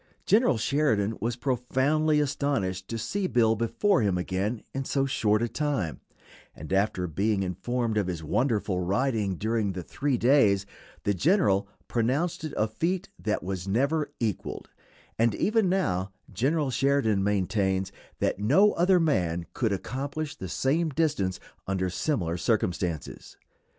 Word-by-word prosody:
General 215 - +4
Sheridan 110 -5 +1
was 115 +1 -1
profoundly 135 +5 +1
astonished 135 -10 -1
to 115 - -4
see 190 - -2
Bill 115 -7 +3
before 165 - +1
him 100 -4 +1
again 95 +5 -2
in 135 - -2
so 135 +1 0
short 110 -4 +1
a - - +1
time, 135 - -2 0.6
and 80 +5 -6
after 95 -2 +1
being 95 +4 0
informed 110 +5 -1
of 100 - -1
his 85 -3 -4
wonderful 105 - 0
riding 100 +1 0
during 110 0 -1
the 90 -1 -5
three 135 - -1
days 110 -7 +4 0.4
the 100 - +1
general 100 - +2 0.2
pronounced 135 +10 0
it 155 - -4
a 110 - +2
feat 175 - -2
that 105 - -1
was 95 0 -4
never 140 +9 +1
equaled; 110 -5 -3 0.5
and 115 -2 +3
even 215 -2 +2
now 100 - 0 0.2
General 135 - +1
Sheridan 130 -7 +2
maintains 95 -1 0 0.3
that - - 0
no 155 - +5
other 180 +2 +3
man 90 - +1
could 115 -4 0
accomplish 140 +9 -4
the 95 - -7
same 155 - +1
distance 145 - 0 0.3
under 95 -1 -1
similar 90 - -1
circumstances. 90 -5 -2
115 Hz, 140 wpm, -27 LUFS, 95-145 Hz, 0.6 s, no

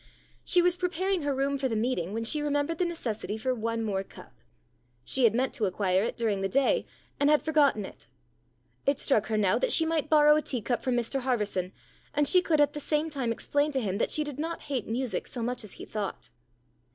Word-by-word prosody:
She 355 -1 +3
was 355 0 +3
preparing 365 +1 -1
her 285 -2 -1
room 275 +1 0
for 265 - 0
the 225 - -2
meeting 215 -6 -1
when 225 +2 -3
she 295 +6 +1
remembered 290 +2 -1
the 360 - +2
necessity 225 -11 -4
for 255 +4 -1
one 230 -1 -2
more 195 -3 -1
cup. - - -15 0.7
She 260 - +2
had 225 -1 +4
meant 260 +2 0
to 220 - -1
acquire 185 -1 +1
it 225 - -2
during 215 -4 0
the 195 - -1
day, 275 - +1 0.3
and 285 - +3
had 300 0 +4
forgotten 290 -9 +2
it. - - -12 0.8
It 280 -1 +3
struck 220 -6 +1
her 220 -1 0
now 200 -3 +2
that - - +1
she 325 - +4
might 320 -2 -1
borrow 300 -1 +6
a 305 - +2
tea 250 -7 -3
cup 245 +1 -1
from 255 -2 0
Mr 240 +3 -1
Harverson, 210 -8 -1 0.4
and 295 -1 +3
she 365 +4 +7
could 320 -4 +1
at 290 - +3
the 295 - -5
same 305 +2 -1
time 260 -5 -2
explain 290 +6 0
to 265 - +1
him 200 -5 -2
that - - +1
she 305 - +1
did 290 -2 -7
not 330 +2 -3
hate 265 -6 -3
music 235 -3 -2
so 240 - -5
much 245 0 -1
as 210 - -8
he - - -9
thought. 195 - -5
260 Hz, 230 wpm, -28 LUFS, 220-300 Hz, 0.8 s, she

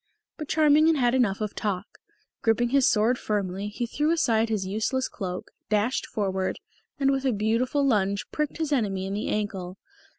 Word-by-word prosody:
But 305 - -6
Charming 310 0 +4
had 325 - +4
had 245 -4 +2
enough 225 -6 +1
of 210 -1 -2
talk. 200 -1 -4 0.4
Griping 235 +1 +2
his 275 0 +4
sword 230 +4 +2
firmly, 200 -1 -2
he 220 +4 -3
threw 295 +6 -1
aside 230 -9 +2
his 210 -4 -1
useless 220 +7 -1
cloak, 185 -3 -6 0.2
dashed 215 +4 +1
forward, 190 -3 -2 0.4
and 275 -1 +3
with 270 -1 0
a 265 - +2
beautiful 235 +6 +1
lunge 200 -6 +1
pricked 300 -1 -2
his 315 -2 -2
enemy 195 -7 0
in 195 - -4
the 210 - -2
ankle. 195 -3 -3
220 Hz, 175 wpm, -26 LUFS, 200-265 Hz, 0.4 s, Charming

